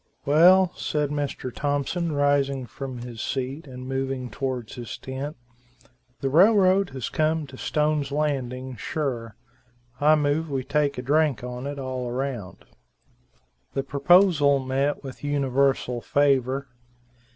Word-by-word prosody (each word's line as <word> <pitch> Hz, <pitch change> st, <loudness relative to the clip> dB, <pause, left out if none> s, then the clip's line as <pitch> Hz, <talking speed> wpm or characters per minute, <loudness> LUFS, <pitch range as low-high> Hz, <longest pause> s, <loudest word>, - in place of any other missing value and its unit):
"Well," 180 Hz, +5 st, +6 dB
said 150 Hz, -2 st, -1 dB
Mr. 145 Hz, -4 st, -3 dB
Thompson, 145 Hz, +4 st, -1 dB
rising 140 Hz, -2 st, +1 dB
from 130 Hz, 0 st, -7 dB
his 120 Hz, -2 st, -7 dB
seat 135 Hz, +4 st, -3 dB
and 130 Hz, -1 st, -8 dB
moving 135 Hz, -2 st, -3 dB
towards 130 Hz, -2 st, -4 dB
his 120 Hz, -2 st, -7 dB
tent, 135 Hz, +3 st, -6 dB, 0.8 s
"the 135 Hz, -, 0 dB
railroad 190 Hz, +2 st, +5 dB
has 130 Hz, -3 st, -5 dB
come 155 Hz, 0 st, 0 dB
to 135 Hz, -1 st, -12 dB
Stone's 150 Hz, 0 st, 0 dB
Landing, 130 Hz, -4 st, -2 dB
sure; 120 Hz, -4 st, -3 dB, 0.6 s
I 150 Hz, +2 st, +5 dB
move 150 Hz, +2 st, 0 dB
we 135 Hz, -2 st, -2 dB
take 145 Hz, +1 st, 0 dB
a 125 Hz, -, -4 dB
drink 145 Hz, -3 st, +2 dB
on 125 Hz, +2 st, -5 dB
it 145 Hz, 0 st, -5 dB
all 130 Hz, -2 st, -4 dB
round." 125 Hz, -6 st, -4 dB, 1.1 s
The 135 Hz, -, 0 dB
proposal 145 Hz, +1 st, +4 dB
met 135 Hz, +2 st, -1 dB
with 135 Hz, 0 st, -9 dB
universal 135 Hz, -3 st, +1 dB
favor. 140 Hz, -1 st, +1 dB
140 Hz, 130 wpm, -25 LUFS, 130-150 Hz, 1.1 s, Well